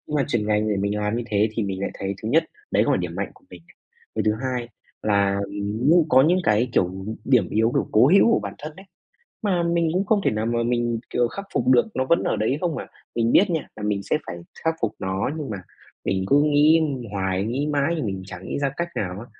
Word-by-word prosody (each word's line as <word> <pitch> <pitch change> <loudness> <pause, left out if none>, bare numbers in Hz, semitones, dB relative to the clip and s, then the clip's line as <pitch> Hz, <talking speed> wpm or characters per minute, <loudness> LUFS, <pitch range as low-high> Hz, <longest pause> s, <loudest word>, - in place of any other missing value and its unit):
Nhưng 150 - -5
mà 140 - +2
chuyển 115 -6 0
ngành 105 0 +1
để 105 - +1
mình 100 +2 -1
làm 105 +2 -1
như 120 - -2
thế 105 0 +2
thì 110 - -2
mình 95 -1 -3
lại 100 - -2
thấy 100 0 -3
thứ 110 - -3
nhất 160 +5 +3 0.3
đấy - - +3
không - - 0
phải - - +2
điểm - - -4
mạnh - - -3
của - - -23
mình. - - -12 0.5
Cái - - 0
thứ 105 - +4
hai 125 -2 -2 0.3
là 100 -1 +2 0.2
nhưng 130 +12 +3
có 130 -1 +6
những 175 +6 +3
cái, 110 +4 +2
kiểu, 95 0 0 0.2
điểm 125 -8 +3
yếu, 110 +2 +2
kiểu, - - 0
cố 110 +4 +6
hữu 200 +8 +5
của - - +4
bản - - -5
thân 155 +1 -7
ấy, 190 - -13 0.6
mà 185 -5 +1
mình 170 -1 +1
cũng 190 +3 +1
không 210 -2 +3
thể - - +3
nào 110 +1 -2
mà 120 0 0
mình, 120 -1 0
kiểu, 120 -1 +1
khắc 200 - -7
phục - - 0
được 130 - +5
nó 130 - +1
vẫn 170 +5 +2
ở - - 0
đấy 120 +6 0
không 175 -3 -1
mà. - - -5 0.3
Mình 115 0 +1
biết 195 +1 +5
nha 160 -3 -2
là 105 - -8
mình 105 -1 -1
sẽ 150 - 0
phải - - -5 0.3
khắc 160 0 +2
phục 115 - 0
nó 95 +5 -2
nhưng 145 -6 -5
mà 105 - -3 0.5
mình 95 -1 0
cứ 145 +1 +5
nghĩ 150 +2 +5 0.3
hoài, 95 -1 -1
nghĩ 130 +7 -1
mãi 145 +2 +1
nhưng 150 - -2
mình 95 -1 -4
chẳng 95 -1 -9
nghĩ - - -3
ra 140 -1 0
cách 170 0 -2
nào 95 0 -3
á. 120 - -9
120 Hz, 260 wpm, -23 LUFS, 105-150 Hz, 0.6 s, có